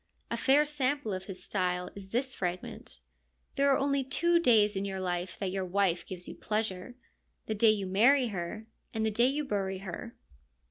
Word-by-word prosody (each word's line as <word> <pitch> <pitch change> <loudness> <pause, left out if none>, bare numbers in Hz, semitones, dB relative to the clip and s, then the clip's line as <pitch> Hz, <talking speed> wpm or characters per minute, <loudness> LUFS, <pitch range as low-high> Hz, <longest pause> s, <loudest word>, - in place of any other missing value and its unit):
A - - +1
fair 285 +2 +4
sample 285 -6 -1
of 185 0 -5
his 185 -2 -6
style 180 -2 -1
is 195 -1 -10
this 250 +4 -1
fragment: 175 - -5 0.3
' 60 0 -43
There 280 0 +3
are 275 - +4
only 275 0 +1
two 340 +6 +2
days 220 -8 +4
in 195 - -1
your 195 -1 -3
life 180 0 -3
that 195 -2 -2
your 190 0 -2
wife 185 -1 0
gives 180 -1 -6
you - - -6
pleasure: 215 +1 -3 0.5
the 220 - -2
day 215 +1 +5
you 210 -2 +2
marry 240 +7 +4
her 195 +3 -5 0.3
and 220 0 0
the 220 - +1
day 235 +4 +3
you 290 +3 -1
bury 195 -5 -2
her.' 195 +5 -7
205 Hz, 195 wpm, -30 LUFS, 185-255 Hz, 0.5 s, day